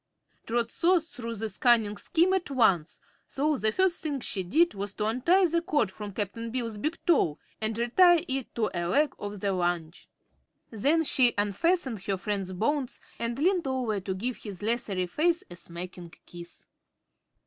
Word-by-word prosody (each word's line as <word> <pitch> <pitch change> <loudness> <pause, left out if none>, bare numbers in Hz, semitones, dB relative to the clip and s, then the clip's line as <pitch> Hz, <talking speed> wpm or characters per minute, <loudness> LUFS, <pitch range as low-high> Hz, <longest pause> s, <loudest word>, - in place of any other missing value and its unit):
Trot 230 0 0
saw 360 +1 +3
through 245 -8 -7
this 215 -2 -5
cunning 225 -4 +4
scheme 350 - +1
at 380 -4 -1
once, 195 - +2 0.3
so 300 +2 0
the 220 -4 +2
first 375 +6 +1
thing 290 -3 -2
she 200 -5 -2
did 315 - +2
was 200 0 -5
to 210 - -2
untie 305 - +3
the 335 0 +1
cord 295 - 0
from 205 +1 -7
Cap'n 215 +3 -3
Bill's 230 -3 -3
big 310 +8 -2
toe 225 - +3 0.2
and 220 0 -1
retie 335 +9 +4
it 265 -1 -3
to 220 -2 0
a 175 -1 -2
leg 285 - +2
of 205 -1 -6
the 200 - 0
lounge. 175 -2 -2 0.6
Then 285 +9 +2
she 255 -5 +3
unfastened 225 - 0
her 195 -1 0
friend's 195 -1 -3
bonds 255 +8 -1 0.2
and 235 +1 -2
leaned 350 +1 +1
over 250 -6 -1
to 190 0 -4
give 240 +6 -3
his 205 -3 -9
leathery 210 -5 0
face 335 - +1
a - - -7
smacking 175 0 -9
kiss. 175 0 -11
230 Hz, 170 wpm, -28 LUFS, 195-295 Hz, 0.6 s, cunning